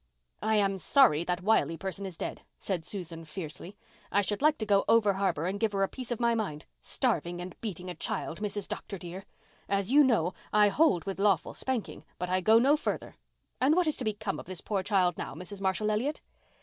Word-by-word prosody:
"I 220 +1 +1
am 195 -2 +2
sorry 210 - +5
that 180 +1 -2
Wiley 185 -5 +2
person 195 +2 -4
is 180 -3 -9
dead," - - -5 0.2
said 185 -5 -3
Susan 170 -3 -5
fiercely. 165 +4 -8 0.3
"I 200 - +4
should 205 +2 -2
like 300 0 +4
to 215 - -3
go 200 -1 +3
over 220 -3 +5
harbour 185 -5 0
and 195 +3 -2
give 220 -1 +1
her 195 0 +1
a - - +2
piece 255 +1 -8
of 240 - -2
my 235 -1 +3
mind. 180 -10 -3 0.2
Starving 175 - -1
and 180 +1 -7
beating 185 -5 -5
a 180 - -4
child, 165 -1 -3
Mrs. 205 -1 -2
Dr. 200 - -5
dear! 180 +2 -8 0.4
As 200 +2 0
you 295 +2 +7
know, 210 - +2 0.2
I 210 -1 +5
hold 275 - +3
with 195 -1 -4
lawful 195 -5 +2
spanking, 260 -5 -3
but 180 0 -3
I 185 0 +2
go 220 +4 +6
no 270 +5 +5
further. 305 - -3 0.5
And 280 +5 +4
what 360 0 +3
is 310 - +1
to - - -4
become 215 -2 -2
of - - -10
this 185 -2 -5
poor 200 -3 -1
child 185 -3 +1
now, - - -5
Mrs. 185 +4 -6
Marshall 195 +3 +1
Elliott?" 255 +9 -1
200 Hz, 215 wpm, -29 LUFS, 180-220 Hz, 0.5 s, you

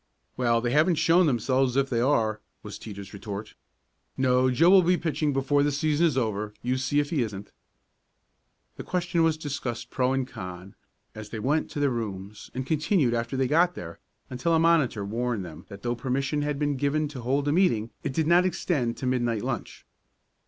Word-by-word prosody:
"Well, 120 -2 +2
they 120 0 -1
haven't 155 +5 +4
shown 165 +3 +4
themselves 130 0 +1
if 135 0 +2
there 120 +1 +2
are," 110 -7 +1 0.2
was - - -8
Teeter's 100 -3 -9
retort. 100 +1 -7 0.6
"No, 130 0 +3
Joe 165 +8 +4
will 195 -1 +8
be 180 +1 +2
pitching 155 -3 -1
before 140 +1 +1
the 145 +1 +2
season 155 +3 +2
is 145 -5 -1
over, 105 -3 -2
you 125 +1 0
see 130 +3 +1
if 145 0 -1
he 155 -6 +1
isn't." 105 -3 -5 1.3
The - - -6
question 175 -2 -1
was 165 -1 +3
discussed 130 -6 -5
pro 130 0 +1
and 135 -1 -1
con, 90 -3 -8 0.4
as 110 -1 -9
they 115 - -6
went 145 +8 0
to - - -5
their 140 -2 +2
rooms, 105 -3 -5
and 130 0 -3
continued 155 - +1
after 115 +2 -2
they 130 -1 +1
got 175 +5 +3
there 85 -1 -8 0.3
until 130 +7 0
a - - +4
monitor 155 -11 +2
warned 115 -1 -2
them 80 0 -11
that 100 -1 -11
though 120 0 0
permission 135 +4 -1
had 145 -1 -1
been 145 -1 0
given 145 +3 0
to 135 -4 -8
hold 135 +4 0
a - - +2
meeting 120 - +2
it - - -3
did 155 +4 0
not 170 +3 +5
extend 145 -9 -1
to 130 - -5
midnight 120 -4 0
lunch. - - -5
130 Hz, 195 wpm, -26 LUFS, 115-150 Hz, 1.3 s, will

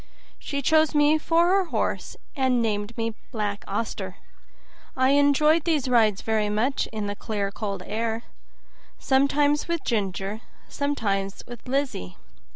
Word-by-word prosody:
She 280 -1 -4
chose 315 +1 +3
me 295 +1 +4
for 335 +2 +3
her 385 0 +3
horse, - - -2 0.2
and 260 -3 +2
named 215 0 -2
me 225 0 -1 0.2
"Black 210 -4 -3
Auster". 190 -5 -3 0.8
I 260 0 +4
enjoyed 285 +3 +4
these 310 -6 +1
rides 220 -5 +3
very 215 -2 +1
much 230 +7 0
in 215 -2 -4
the 205 0 -3
clear 205 -1 -3
cold 200 -2 -4
air, 225 +1 -2 0.7
sometimes 285 +2 +2
with 340 -2 -2
Ginger, 200 -1 -2 0.3
sometimes 200 -9 -2
with 240 0 -11
Lizzie. 255 - -2
235 Hz, 135 wpm, -25 LUFS, 210-285 Hz, 0.8 s, me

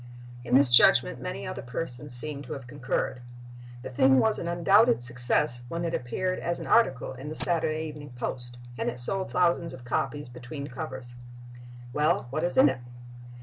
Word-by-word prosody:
In 125 0 -3
this 135 -2 +4
judgment - - +2
many - - -8
other - - -9
persons 125 +1 -9
seem 140 +3 -4
to - - -9
have 135 -3 -11
concurred. 125 -1 -6 0.6
The 130 - -9
thing 130 +1 +1
was 220 +9 -1
an 170 - -8
undoubted 175 - 0
success 120 0 -4
when 170 +6 -7
it 165 - -6
appeared 185 +10 -5
as 170 0 -6
an - - -10
article 135 - -1
in 135 +3 -11
the 155 - -9
Saturday 160 -2 +10
Evening 150 -2 -12
Post 120 0 -8 0.2
and - - -4
it 120 - -10
sold 190 +10 -7
thousands 170 -3 -3
of 130 -1 -15
copies 145 +3 -6
between 125 +4 -11
covers. 130 -3 -10 0.8
Well, 155 +5 -2
what 155 +4 -5
is 175 - -5
in - - +4
it? 130 -2 -4
140 Hz, 180 wpm, -24 LUFS, 125-165 Hz, 0.8 s, Saturday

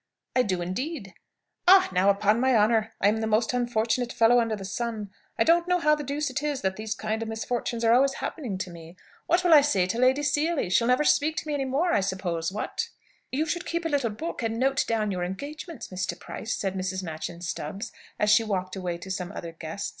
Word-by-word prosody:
"I 255 - +5
do, 185 -6 -1
indeed." 200 - -4 0.5
"Ah, 380 +1 +8
now, 185 +2 +3
upon 205 +2 +3
my 260 0 +3
honour, 220 0 +3
I 200 - +3
am 215 +2 +3
the 220 0 -1
most 220 +2 +1
unfortunate 240 0 0
fellow 235 +2 +5
under 230 -2 0
the 195 -2 -7
sun! 215 0 -4 0.3
I - - +4
don't 340 +1 +3
know 360 0 +3
how 300 -3 +3
the 300 -1 -1
deuce 285 +1 -2
it 260 - -2
is 295 -2 -2
that 190 0 -1
these 215 0 -4
kind 215 +2 -3
of 225 - -3
misfortunes 230 +1 -3
are 230 0 +5
always 270 +2 +4
happening 245 - -4
to 185 -1 -5
me. 165 0 -11 0.3
What 350 +1 +3
will 350 -2 +5
I 300 - +9
say 205 -11 +2
to 200 +6 -2
Lady 260 +3 +3
Seely? 295 - 0
She'll 230 +5 +3
never 250 +4 +3
speak 305 +1 +3
to 310 - -3
me 300 - -1
any 275 -2 -1
more, 290 +7 +1
I - - +4
suppose, 185 -3 -2
what?" 210 - -3 0.4
"You 295 +4 0
should 335 +2 -3
keep 335 0 -2
a - - +1
little 280 -6 +1
book 310 +11 -5
and 225 -1 -1
note 270 +2 +2
down 215 -2 0
your 180 -2 -2
engagements, 285 - -6
Mr. 185 -1 -3
Price," 225 - -5
said 195 -2 -2
Mrs. 190 0 -3
Machyn 165 +1 -6
Stubbs, 195 +7 -5 0.3
as 210 0 +2
she 210 +2 +6
walked 185 -3 -2
away 180 -2 -3
to 190 +3 -8
some 180 0 -4
other 170 -5 -6
guest. 165 +4 -5
225 Hz, 230 wpm, -26 LUFS, 190-275 Hz, 0.5 s, I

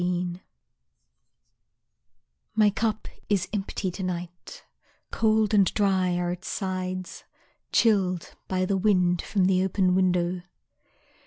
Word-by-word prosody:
Absence 175 0 -1 2.2
My 210 -1 +5
cup 220 +1 -2 0.2
is 195 -4 +1
empty 195 -2 -2
to 190 - -7
night, 175 -1 -6 0.5
Cold 220 -1 +2
and 200 -3 +4
dry 190 -3 +2
are 175 0 -1
its 180 +2 -7
sides, 185 -2 -4 0.5
Chilled 190 -6 +2
by 185 0 0
the 195 +1 0
wind 180 -3 +2
from 195 -3 0
the 185 0 +3
open 190 -1 +1
window. 180 -1 +1
185 Hz, 110 wpm, -26 LUFS, 180-200 Hz, 2.2 s, My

